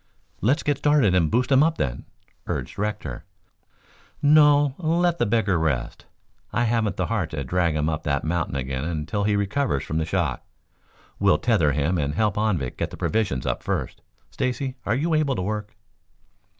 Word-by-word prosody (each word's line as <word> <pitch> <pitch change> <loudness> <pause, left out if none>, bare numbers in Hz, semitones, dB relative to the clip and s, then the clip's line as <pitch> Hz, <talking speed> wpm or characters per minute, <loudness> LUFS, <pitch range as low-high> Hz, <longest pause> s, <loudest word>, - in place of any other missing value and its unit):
"Let's 135 +9 +2
get 145 -1 0
started 145 -10 +3
and 85 -4 +3
boost 125 - +1
him 135 0 +6
up, 160 +1 +2
then," - - -3 0.4
urged - - -4
Rector. 105 -11 -3 1.0
"No, 145 -1 +5
let 170 0 +1
the - - +2
beggar 105 -5 +1
rest. 70 -7 -2 0.4
I 120 - +1
haven't 110 -4 0
the - - 0
heart 105 -8 -1
to 75 -3 -4
drag 85 +3 0
him 75 0 0
up 80 -1 -1
that 70 -3 -1
mountain 80 -3 -1
again 65 0 -3
until 85 +5 -2
he 105 -1 +2
recovers 100 - 0
from 80 - -2
the 80 - -1
shock. 80 - -1 0.8
We'll 75 - +4
tether 85 - +2
him 75 +5 0
and 70 0 -1
help 105 -1 +1
Anvik 95 -12 -1
get - - -2
the - - -10
provisions 100 - -1
up - - -1
first. - - -3 0.3
Stacy, 130 +1 -2
are 105 - +2
you 160 +6 0
able 155 -3 +2
to 95 - -2
work?" 105 +1 -4
105 Hz, 175 wpm, -24 LUFS, 80-130 Hz, 1.0 s, him